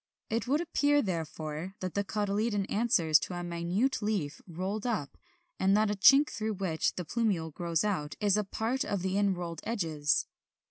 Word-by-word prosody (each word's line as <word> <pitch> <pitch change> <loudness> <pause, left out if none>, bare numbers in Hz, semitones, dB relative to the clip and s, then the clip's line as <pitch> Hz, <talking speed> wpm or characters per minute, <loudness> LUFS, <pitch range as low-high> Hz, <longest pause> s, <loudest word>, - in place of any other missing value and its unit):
It 230 +1 -1
would 290 +5 +2
appear 290 -3 +2
therefore 165 -1 -4
that 185 -2 -4
the 200 - 0
cotyledon 205 +1 -1
answers 190 - +3
to 180 - -5
a 175 - -4
minute 175 +10 -1
leaf 200 -9 -2
rolled 190 +6 -3
up, 195 - -2 0.4
and 195 +2 +4
that 215 -1 +2
a - - +1
chink 275 +9 +6
through 220 0 -2
which 180 -5 -1
the 180 - -4
plumule 185 -7 -1
grows 170 0 -1
out 180 -8 -2
is 205 -2 +3
a 210 - +1
part 225 +6 -1
of 200 -3 -2
the 190 0 -1
inrolled 180 -5 -1
edges. 160 -10 0
195 Hz, 175 wpm, -30 LUFS, 170-215 Hz, 0.4 s, chink